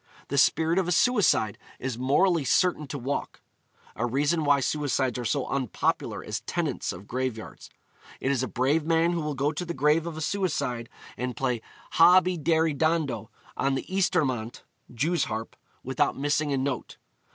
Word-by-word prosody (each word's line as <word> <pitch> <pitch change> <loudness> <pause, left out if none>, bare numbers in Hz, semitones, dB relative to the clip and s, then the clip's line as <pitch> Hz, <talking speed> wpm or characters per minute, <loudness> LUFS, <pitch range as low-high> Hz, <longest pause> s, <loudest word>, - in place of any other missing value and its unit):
The 140 - -1
spirit 165 +6 +3
of 185 - -1
a - - 0
suicide 195 - +3 0.2
is 130 -2 -3
morally 145 +7 +2
certain 155 +1 +2
to 140 - -5
walk: 135 +2 -4 0.6
a 115 - -3
reason 145 +7 +1
why 145 -1 +4
suicides 135 -3 0
are 120 - -4
so 130 +4 0
unpopular 130 -7 -1
as - - -3
tenants - - -2
of 95 +3 -10
graveyards. 125 -3 -4 0.5
It 135 - 0
is 135 -3 +1
a 130 - -1
brave 140 +6 +1
man 165 +1 +2
who 170 -1 -1
will 150 -1 -3
go 140 +3 +1
to 160 +3 -4
the 170 -1 -5
grave 150 +4 +2
of 165 -2 -5
a - - -5
suicide 145 -10 -1 0.3
and 125 +1 -4
play 125 -5 -1 0.3
'Hob 180 +2 +6
y 185 0 0
deri 160 0 +2
dando' 145 -8 0 0.3
on 135 0 0
the - - -3
ysturmant 130 - 0 0.3
(jew's 150 +6 0
harp), 110 +1 -5 0.3
without - - 0
missing 145 +1 0
a 140 - +1
note. 130 -2 -3
145 Hz, 175 wpm, -27 LUFS, 130-165 Hz, 0.6 s, Hob